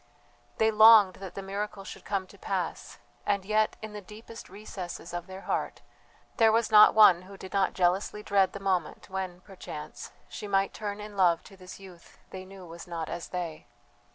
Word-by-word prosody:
They 220 0 +3
longed 215 -3 +7
that 190 -2 -9
the 195 - -6
miracle 200 +1 -5
should - - -10
come 195 -2 -2
to - - -17
pass, - - -4 0.3
and 200 -2 -1
yet, 215 +1 +1
in 215 -1 -7
the 210 - -7
deepest 220 +3 -12
recesses 185 -4 -8
of 175 -1 -5
their 190 0 -9
hearts, - - -3 0.5
there 225 -1 +5
was 225 0 +1
not 210 -1 +8
one 195 -5 +7
who 195 +2 -13
did 190 - -10
not 195 -1 +1
jealously 190 +3 0
dread 195 -2 +2
the 200 - -6
moment 190 -2 -2
when, 185 -2 -5
perchance, 180 -6 -9 0.2
she 210 - -8
might 195 -1 +1
turn 205 -1 -5
in 210 0 -9
love 175 -4 +3
to 195 - -15
this 185 0 -12
youth 185 -3 -15
they 190 0 -8
knew 190 -1 -12
was 170 +1 -11
not 165 -2 -5
as 170 - -5
they. 175 -4 -6
195 Hz, 190 wpm, -28 LUFS, 180-210 Hz, 0.5 s, not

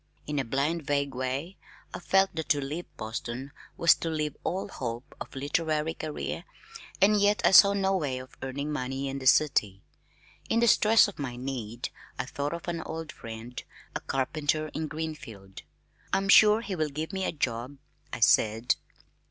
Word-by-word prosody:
In 150 -1 -2
a - - +1
blind 140 +7 0
vague 140 -1 -1
way 130 +8 -3 0.4
I - - -4
felt 190 +3 +3
that 160 -1 -4
to 145 - +3
leave 150 +5 -4
Boston 120 +4 -5 0.3
was 170 - +6
to 165 - -4
leave 150 -2 -2
all 185 +3 -2
hope 120 -8 -6
of - - -8
a - - -6
literary 155 +2 0
career 155 -2 -5 0.6
and 205 +1 +5
yet 205 +1 +3
I - - +6
saw 200 +1 +9
no 195 -1 +1
way 145 -8 -1
of 130 0 -10
earning 140 +3 -3
money 135 -1 -3
in 135 0 -4
the 130 - -2
city. 105 -10 +3 0.7
In 230 - +3
the 235 - +4
stress 220 0 +6
of 205 - -9
my 130 -4 -4
need 120 -3 -5 0.3
I - - -2
thought 145 +2 -3
of 170 - -9
an 170 -1 -2
old 160 0 -6
friend, 115 +2 -8 0.3
a - - 0
carpenter 150 +3 -1
in 155 +1 -4
Greenfield. 145 -12 -7 0.5
"I'm 195 0 +1
sure 215 +2 +7
he 205 -5 -4
will 155 -3 0
give 155 +6 -5
me 190 0 -2
a - - 0
job," 130 -2 -3 0.3
I - - -6
said. 115 +2 +4
150 Hz, 180 wpm, -28 LUFS, 130-170 Hz, 0.7 s, saw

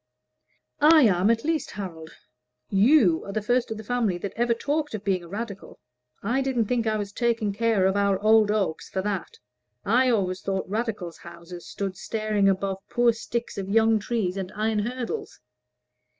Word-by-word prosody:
"I 305 +1 +7
am, 195 -2 +3
at 230 0 +2
least, 320 0 -1
Harold. 165 -6 -7 0.6
You 200 - +4
are 200 - -7
the 215 - -1
first 245 +3 +1
of 220 - -4
your 220 - -8
family 230 -6 0
that 195 +3 -6
ever 235 0 +1
talked 295 +1 -2
of 210 - -7
being 190 -3 0
a - - -11
Radical. 200 +1 -7 0.4
I 240 +7 +1
did 265 -1 -2
not 230 - +3
think 235 -1 0
I 215 0 +1
was 205 -1 -4
taking 230 -2 0
care 225 -3 +2
of 190 +1 +2
our 200 -1 +2
old 215 0 +4
oaks 200 -7 -1
for 190 - -3
that. 210 - -4 0.5
I 250 +5 +3
always 190 -5 0
thought 195 -1 -2
Radicals' 205 -4 -3
houses 170 0 -11
stood 195 -2 -4
staring 215 -2 0
above 195 0 -1
poor 240 -1 +3
sticks 230 -1 -4
of 195 0 -5
young 225 +1 +4
trees 205 -4 -2
and 190 -1 -4
iron 215 0 0
hurdles." 240 +2 -4
215 Hz, 180 wpm, -25 LUFS, 195-235 Hz, 0.6 s, I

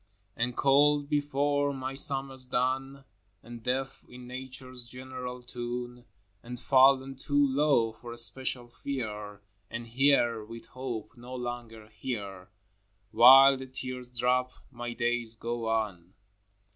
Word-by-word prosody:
IV. 105 - -35 0.4
And 120 0 -3
cold 145 +1 +4
before 145 -1 0
my 130 0 -4
summer's 135 -1 +2
done, 135 +2 -1 0.4
And 120 0 -10
deaf 130 +3 -3
in 125 0 -11
Nature's 130 0 -6
general 125 0 -8
tune, 120 0 -6 0.4
And 120 +2 -8
fallen 135 +2 +4
too 145 +2 +1
low 135 -4 +2
for 120 +1 -10
special 125 +1 +1
fear, 105 -6 -6 0.3
And 115 0 -6
here, 120 -2 +2
with 115 +1 -10
hope 125 -3 -6
no 125 +2 -9
longer 120 -3 -6
here, 105 -4 -6 0.3
— 100 +1 -43
While 135 +4 +8
the 130 0 -8
tears 130 -1 -6
drop, 125 +1 +1 0.2
my 120 -1 -6
days 120 -1 -1
go 115 0 -4
on. 100 -6 -2
125 Hz, 130 wpm, -29 LUFS, 115-135 Hz, 0.4 s, While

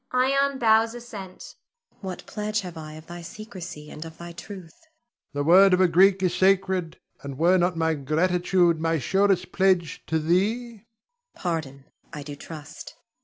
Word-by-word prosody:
[Ion 275 +2 +2
bows 225 -1 +3
assent.] 210 -6 -9 0.5
What 190 -3 -7
pledge 215 0 -2
have 180 -3 -8
I 155 -1 -8
of 155 +1 -11
thy 175 +1 -9
secrecy, 180 -5 -9
and 150 - -7
of 160 0 -11
thy 170 0 -9
truth? 180 -1 -10
Ion. 320 -1 -30 0.4
The 145 0 -1
word 185 +5 +6
of - - -3
a 185 - +5
Greek 190 +3 +4
is 180 -2 +2
sacred, 190 -3 +1 0.2
and 140 -2 -7
were 175 +4 +4
not 175 0 +1
my 160 0 +1
gratitude 175 +3 +1
my 165 0 +1
surest 195 +4 +1
pledge 185 -4 +1
to 160 - 0
thee? 195 +10 +1
Zuleika. 215 -3 -18 0.5
Pardon, 150 -6 -4 0.3
I 150 -3 -7
do 145 0 -8
trust. 150 +1 -10
180 Hz, 170 wpm, -25 LUFS, 160-195 Hz, 0.5 s, word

